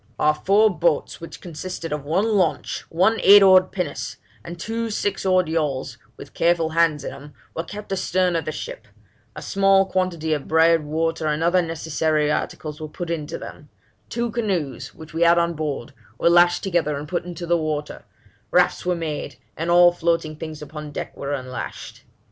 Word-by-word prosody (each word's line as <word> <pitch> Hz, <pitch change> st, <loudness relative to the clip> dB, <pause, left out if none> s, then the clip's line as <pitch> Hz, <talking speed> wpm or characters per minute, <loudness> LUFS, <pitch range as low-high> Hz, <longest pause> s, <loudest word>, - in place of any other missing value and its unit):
Our 150 Hz, -, +3 dB
four 205 Hz, +7 st, +3 dB
boats, -, -, 0 dB
which -, -, -9 dB
consisted 170 Hz, -1 st, -6 dB
of 150 Hz, -2 st, -4 dB
one 185 Hz, +9 st, +1 dB
launch, 195 Hz, -, 0 dB
one 190 Hz, +7 st, +2 dB
eight 200 Hz, 0 st, +8 dB
oared 185 Hz, -1 st, +6 dB
pinnace, 175 Hz, -7 st, -4 dB, 0.3 s
and 170 Hz, 0 st, -8 dB
two 225 Hz, +4 st, -3 dB
six 200 Hz, -2 st, -2 dB
oared 185 Hz, -2 st, +3 dB
yawls, 150 Hz, -5 st, -2 dB, 0.2 s
with -, -, -11 dB
careful 170 Hz, -1 st, +2 dB
hands 160 Hz, -2 st, +2 dB
in -, -, -4 dB
them, 145 Hz, 0 st, -12 dB, 0.2 s
were 165 Hz, -, -2 dB
kept 205 Hz, +4 st, -9 dB
astern 185 Hz, -1 st, +1 dB
of 165 Hz, -, -1 dB
the 155 Hz, -, -2 dB
ship; -, -, -7 dB, 0.5 s
a -, -, -7 dB
small 195 Hz, -1 st, +3 dB
quantity 175 Hz, -5 st, -1 dB
of 145 Hz, -2 st, -3 dB
bread, 165 Hz, 0 st, +4 dB
water, 160 Hz, +1 st, -1 dB
and 150 Hz, +1 st, 0 dB
other 175 Hz, +2 st, +3 dB
necessary 160 Hz, -2 st, 0 dB
articles, 150 Hz, 0 st, -4 dB
were 155 Hz, -, -4 dB
put 170 Hz, +3 st, -6 dB
into 155 Hz, -3 st, -3 dB
them; -, -, -10 dB, 0.4 s
two 235 Hz, -1 st, -2 dB
canoes, 185 Hz, -, -3 dB
which 160 Hz, 0 st, -12 dB
we 165 Hz, -, -3 dB
had 170 Hz, 0 st, +6 dB
on 170 Hz, 0 st, +2 dB
board, 145 Hz, -4 st, -4 dB, 0.2 s
were 170 Hz, -, +3 dB
lashed 175 Hz, 0 st, +5 dB
together 165 Hz, -6 st, 0 dB
and 145 Hz, +1 st, -6 dB
put 175 Hz, +3 st, -2 dB
into 175 Hz, 0 st, -7 dB
the 170 Hz, 0 st, +2 dB
water; 155 Hz, -2 st, -3 dB, 0.5 s
rafts -, -, +2 dB
were 180 Hz, 0 st, 0 dB
made, 160 Hz, -3 st, -4 dB, 0.2 s
and 165 Hz, +2 st, -3 dB
all 175 Hz, 0 st, +7 dB
floating 165 Hz, -2 st, -1 dB
things 155 Hz, -1 st, -7 dB
upon 150 Hz, 0 st, -8 dB
deck -, -, -6 dB
were 140 Hz, -, -5 dB
unlashed. 130 Hz, -2 st, -6 dB
165 Hz, 185 wpm, -22 LUFS, 155-185 Hz, 0.5 s, eight